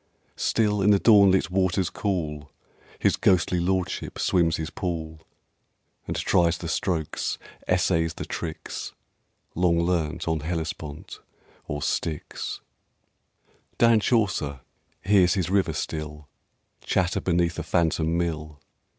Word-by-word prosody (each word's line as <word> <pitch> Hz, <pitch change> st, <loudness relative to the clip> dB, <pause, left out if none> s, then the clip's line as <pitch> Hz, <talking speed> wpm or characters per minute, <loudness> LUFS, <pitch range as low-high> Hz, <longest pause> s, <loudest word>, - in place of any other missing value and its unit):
Still 105 Hz, -3 st, +1 dB
in 100 Hz, -, +4 dB
the 100 Hz, -, +6 dB
dawnlit 100 Hz, -5 st, +5 dB
waters 95 Hz, -1 st, +1 dB
cool 75 Hz, -8 st, -3 dB, 0.5 s
His -, -, +2 dB
ghostly 90 Hz, 0 st, +2 dB
Lordship 95 Hz, +1 st, -1 dB
swims 85 Hz, -3 st, +2 dB
his 80 Hz, 0 st, -4 dB
pool, 80 Hz, -3 st, -4 dB, 0.9 s
And -, -, -3 dB
tries 85 Hz, -1 st, +2 dB
the 85 Hz, -, -6 dB
strokes, 80 Hz, -1 st, -1 dB, 0.3 s
essays 80 Hz, -1 st, +1 dB
the -, -, -5 dB
tricks, 80 Hz, -1 st, -6 dB, 0.6 s
Long 85 Hz, -1 st, +2 dB
learnt 85 Hz, -3 st, -1 dB
on 80 Hz, -1 st, +1 dB
Hellespont, 80 Hz, -2 st, -5 dB, 0.5 s
or 75 Hz, 0 st, -3 dB
Styx. 75 Hz, -3 st, -3 dB, 1.2 s
Dan 115 Hz, -1 st, +5 dB
Chaucer 95 Hz, -, 0 dB, 0.4 s
hears 95 Hz, -3 st, +4 dB
his 90 Hz, -2 st, -1 dB
river 100 Hz, -1 st, +2 dB
still 75 Hz, -1 st, -5 dB, 0.6 s
Chatter 90 Hz, -1 st, 0 dB
beneath 85 Hz, -1 st, +1 dB
a -, -, -3 dB
phantom 85 Hz, -1 st, +1 dB
mill. 80 Hz, -3 st, -3 dB
85 Hz, 115 wpm, -25 LUFS, 80-95 Hz, 1.2 s, the